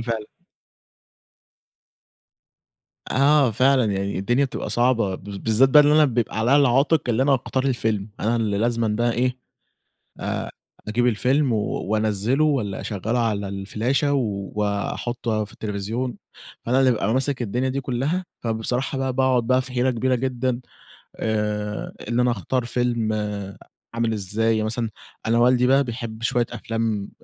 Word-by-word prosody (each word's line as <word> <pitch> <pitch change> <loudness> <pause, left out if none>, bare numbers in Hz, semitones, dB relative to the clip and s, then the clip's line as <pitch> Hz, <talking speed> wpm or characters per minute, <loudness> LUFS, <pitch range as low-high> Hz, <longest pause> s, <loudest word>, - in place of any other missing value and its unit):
فعلًا. 110 -2 -2 2.8
آه 140 -1 +4
فعلًا، 130 +3 +3
يعني 100 0 -2
الدنيا 120 +8 +2
بتبقى 135 - -4
صعبة 120 -6 +2
بالذات 105 +6 +1
بقي 150 +3 +8
اللي 145 +1 +4
أنا 155 0 +6
بيبقى 120 -5 -1
عليّا 120 +5 +4
العاتق 140 +3 +3
اللي 120 +2 +2
أنا 140 0 +4
اختار 130 +1 -2
الفيلم، 110 -6 -1
أنا 115 +2 +1
ال 110 -2 0
لازمًا 115 +2 0
بقى 120 +3 +1
إيه 125 +2 0 0.8
آآ - - -3 0.4
أجيب 120 +3 +1
الفيلم 125 +4 +2
وأنزّله 110 +4 0
والّا 125 -11 0
أشغّله 110 +3 -2
على 105 -4 0
الفلاشة 110 +9 -1
وأحطه 105 0 -2
في 105 - -13
التلفزيون، 110 +4 -4 0.5
فأنا 125 +3 +2
اللي 130 -1 +5
بابقى 110 -3 0
ماسك 135 0 0
الدنيا 125 +4 -1
دي 135 +1 -2
كُلّها، 135 +8 -1 0.2
فبصراحة 125 +4 -1
بقى 130 -1 -1
باقعد 130 -2 +2
بقى 130 +1 +3
في 130 0 -7
حيرة 125 +1 +2
كبيرة 130 +1 0
جدًا 125 0 -1 0.6
آآ 105 -1 -2 0.2
إن 120 +1 +1
أنا 125 0 +3
أختار 120 +3 -2
فيلم 120 -2 0 0.8
عامل 115 -1 0
إزاي، 110 +2 0
مثلًا 115 +1 -2 0.4
أنا 115 +1 +3
والدي 125 +1 +4
بقى 135 +2 +4
بيحب 115 -3 -6
شوية 120 +1 +1
أفلام 115 -3 -2
120 Hz, 140 wpm, -23 LUFS, 110-130 Hz, 2.8 s, بقي